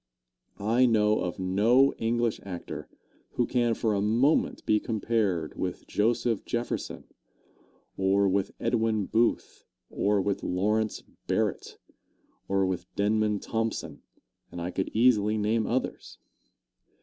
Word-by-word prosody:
I 115 +5 +3
know 105 -2 +3
of 90 -1 -3
no 110 +9 +3
English 115 0 0
actor 90 -3 -7 0.4
who 120 - +1
can 120 -2 +1
for 110 -1 0
a 100 - 0
moment 120 +9 +2
be 105 - +3
compared 105 -8 -1
with 90 -1 -4
Joseph 115 +1 0
Jefferson, 120 0 -3 0.9
or 95 +1 +3
with 95 0 +1
Edwin 110 -3 0
Booth, 115 +4 0 0.3
or 105 0 +1
with 100 +1 -1
Lawrence 105 +4 0 0.2
Barrett, - - -1 0.7
or 95 0 +2
with 90 -1 -3
Denman 105 0 +1
Thompson, 115 -1 -3 0.5
and 85 - -7
I 85 +1 -3
could 95 +1 -2
easily 110 -3 +3
name 110 +1 0
others. 130 +2 -3
105 Hz, 120 wpm, -28 LUFS, 100-115 Hz, 0.9 s, I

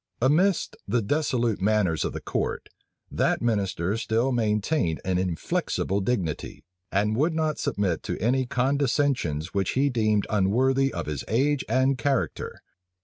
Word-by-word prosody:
Amidst 165 +9 +2
the 115 +2 +1
dissolute 120 -4 0
manners 100 -5 +2
of - - -2
the - - -6
court, - - -3 0.4
that - - +1
minister 100 -4 0
still 115 +3 0
maintained 105 - 0
an 90 -1 +1
inflexible 95 +2 -1
dignity, 95 -8 -2 0.3
and 105 +2 +1
would 155 +7 +1
not 155 -1 0
submit 95 -5 -1
to - - -4
any 130 +4 +1
condescensions 130 - 0
which 100 -2 0
he 140 +2 +2
deemed 110 -3 +1
unworthy 130 +7 +2
of - - -4
his 75 -3 -4
age 135 +5 +1
and 130 +2 +2
character. 135 +1 -2
115 Hz, 140 wpm, -26 LUFS, 100-135 Hz, 0.4 s, Amidst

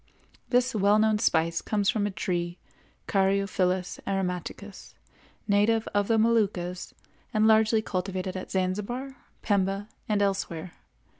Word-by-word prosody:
This 250 +1 +2
well 205 0 +4
known 215 0 +3
spice 165 -5 +1
comes 205 -2 -1
from 210 -3 0
a - - -2
tree, 175 -1 -3 0.5
Caryophyllus 190 -2 +1
aromaticus, 195 +1 -4 0.5
native 215 +2 +2
of 205 0 +1
the 225 - +3
Moluccas, 205 -6 0 0.4
and 215 0 +4
largely 220 0 +4
cultivated 185 -1 -3
at 185 - -6
Zanzibar, 210 +8 -2 0.3
Pemba, 200 0 0 0.2
and 205 -1 +2
elsewhere. 185 -3 -2
200 Hz, 120 wpm, -27 LUFS, 185-215 Hz, 0.5 s, well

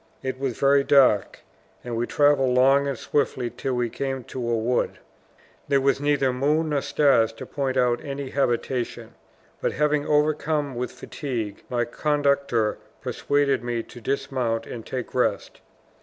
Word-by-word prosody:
It 130 -1 -3
was 135 -3 -2
very 140 0 +4
dark; 135 -8 +3 0.4
and 120 -1 -4
we 120 +1 -1
traveled 145 -3 +3
long 135 +2 +4
and 135 -3 -2
swiftly 125 -3 -1
till 130 0 -2
we 120 -1 0
came 135 +2 -4
to 120 0 -5
a 115 - +1
wood. 120 +3 0 0.7
There 140 -1 +3
was 135 +1 +1
neither 145 -3 +2
moon 150 +5 +1
nor 145 -2 +1
stars 135 -8 +3
to - - -9
point 135 -2 -2
out 120 -1 +2
any 140 -1 -5
habitation. 125 -2 -1 0.5
But - - -1
being 150 -1 +1
overcome 150 -1 +1
with 125 0 -3
fatigue, 115 -9 -5
my 120 -1 0
conductor 140 -4 0 0.2
persuaded 140 -3 0
me 120 -1 -2
to 120 - -13
dismount 125 -3 -1
and 115 - -7
take 125 +1 -5
rest. - - -1
135 Hz, 155 wpm, -24 LUFS, 120-140 Hz, 0.7 s, very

